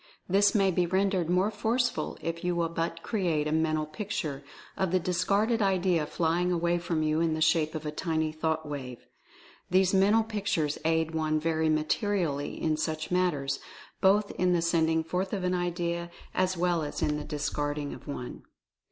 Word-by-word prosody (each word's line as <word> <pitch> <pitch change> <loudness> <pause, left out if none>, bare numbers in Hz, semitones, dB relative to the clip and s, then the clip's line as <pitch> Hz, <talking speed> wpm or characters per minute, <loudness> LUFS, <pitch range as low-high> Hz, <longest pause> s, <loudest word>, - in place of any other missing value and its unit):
This 200 +3 +4
may 195 -2 +4
be 180 0 +1
rendered 190 -2 +1
more 185 +4 +2
forceful 240 +3 -1
if 165 0 -4
you 180 0 0
will 170 -1 0
but 165 0 -3
create 170 -9 0
a - - -1
Mental 155 -1 +1
Picture 155 -4 -4 0.3
of 190 - 0
the 185 +2 +2
discarded 200 +6 +1
idea 185 -5 +2
flying 175 +3 0
away 175 0 +1
from 170 -2 -1
you 155 0 +1
in 165 -1 +1
the - - -3
shape 155 0 +2
of 155 0 -5
a 150 - -2
tiny 160 0 -1
thought 160 0 -2
wave. 130 -4 -6 0.6
These 185 +1 +3
Mental 205 +4 +4
Pictures 200 -9 -1
aid 160 0 +1
one 155 -1 +1
very 160 0 +1
materially 155 -1 0
in 155 -1 0
such 155 +1 -3
matters, 175 -7 +1 0.4
both 200 +2 +4
in 180 0 +3
the 170 - +2
sending 160 -1 +2
forth 185 +4 -2
of 195 -3 -2
an 180 0 +1
idea, 175 -1 -2 0.2
as 185 0 +1
well 175 -1 +1
as 150 -1 -3
in 150 0 +1
the 150 - -4
discarding 145 0 -3
of - - -12
one. 125 -4 -6
170 Hz, 180 wpm, -29 LUFS, 155-185 Hz, 0.6 s, This